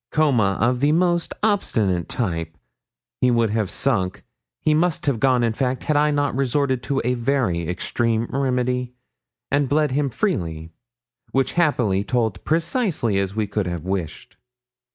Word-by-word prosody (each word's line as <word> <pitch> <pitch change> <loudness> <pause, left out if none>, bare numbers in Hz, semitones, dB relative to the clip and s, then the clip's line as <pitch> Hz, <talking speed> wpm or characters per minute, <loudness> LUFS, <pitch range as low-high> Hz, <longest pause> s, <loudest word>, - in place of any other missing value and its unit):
Coma 125 -11 +2
of 125 +1 +2
the 145 +3 +3
most 175 0 +1
obstinate 105 - +1
type. 80 -7 -3 0.6
He 125 - +3
would 115 -3 +2
have 110 -3 0
sunk 105 -9 -1 0.4
he 155 - +2
must 170 +2 +1
have 140 -6 +1
gone, 130 -2 +3
in 115 -1 +1
fact, 130 +2 -1
had 150 - 0
I 150 +1 +4
not 145 -1 0
resorted 135 -1 0
to 135 +2 -1
a 125 - +2
very 120 - 0
extreme 115 +5 0
remedy, 125 -2 -1 0.6
and 140 -1 +2
bled 150 0 +2
him 140 +1 +1
freely, 85 - -2 0.6
which 135 0 +1
happily 120 - +1
told 115 -3 -1
precisely 165 - 0
as 100 0 -2
we 110 -1 0
could 105 -1 -2
have 85 -3 -4
wished. 95 -5 -4
125 Hz, 155 wpm, -22 LUFS, 105-145 Hz, 0.6 s, I